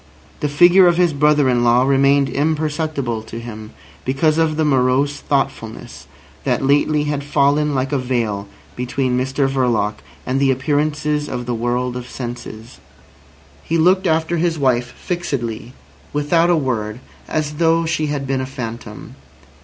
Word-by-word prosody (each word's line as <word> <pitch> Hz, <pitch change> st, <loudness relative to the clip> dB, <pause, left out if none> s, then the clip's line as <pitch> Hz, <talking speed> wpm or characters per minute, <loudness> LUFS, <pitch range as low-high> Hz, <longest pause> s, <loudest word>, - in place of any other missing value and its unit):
The 150 Hz, -, -1 dB
figure 175 Hz, +5 st, +6 dB
of 175 Hz, -1 st, +3 dB
his 175 Hz, -3 st, +3 dB
brother 150 Hz, -1 st, +3 dB
in 120 Hz, -2 st, +2 dB
law 120 Hz, +1 st, +4 dB
remained 140 Hz, +1 st, +3 dB
imperceptible 150 Hz, -3 st, -1 dB
to 110 Hz, +1 st, -8 dB
him 110 Hz, -2 st, -8 dB, 0.3 s
because 150 Hz, +4 st, +1 dB
of 155 Hz, -2 st, +1 dB
the 160 Hz, -, +2 dB
morose 135 Hz, +1 st, +2 dB
thoughtfulness 135 Hz, -5 st, -3 dB, 0.4 s
that -, -, 0 dB
lately 145 Hz, +2 st, +2 dB
had 145 Hz, -1 st, -2 dB
fallen 145 Hz, +1 st, +2 dB
like 130 Hz, +1 st, -1 dB
a 140 Hz, -, +1 dB
veil 115 Hz, -6 st, -2 dB, 0.3 s
between 125 Hz, +1 st, -1 dB
Mr 135 Hz, +2 st, 0 dB
Verloc 120 Hz, -6 st, 0 dB, 0.3 s
and 130 Hz, +1 st, 0 dB
the 140 Hz, -1 st, +3 dB
appearances 150 Hz, +2 st, 0 dB
of 125 Hz, -1 st, -4 dB
the 120 Hz, -, -2 dB
world 120 Hz, +2 st, -1 dB
of 125 Hz, 0 st, -6 dB
senses. 120 Hz, -2 st, -8 dB, 0.8 s
He 165 Hz, -, -1 dB
looked 185 Hz, +3 st, +3 dB
after 160 Hz, +1 st, +1 dB
his 165 Hz, 0 st, 0 dB
wife 125 Hz, -4 st, +1 dB
fixedly, 125 Hz, -, -4 dB, 0.4 s
without 155 Hz, +4 st, +2 dB
a 175 Hz, -, +4 dB
word, 115 Hz, -6 st, -2 dB, 0.3 s
as 150 Hz, -1 st, -2 dB
though 165 Hz, 0 st, +2 dB
she 160 Hz, -1 st, -1 dB
had 145 Hz, -2 st, -3 dB
been 135 Hz, -1 st, -1 dB
a 130 Hz, -, -4 dB
phantom. 115 Hz, -4 st, -7 dB
140 Hz, 155 wpm, -19 LUFS, 125-150 Hz, 0.8 s, figure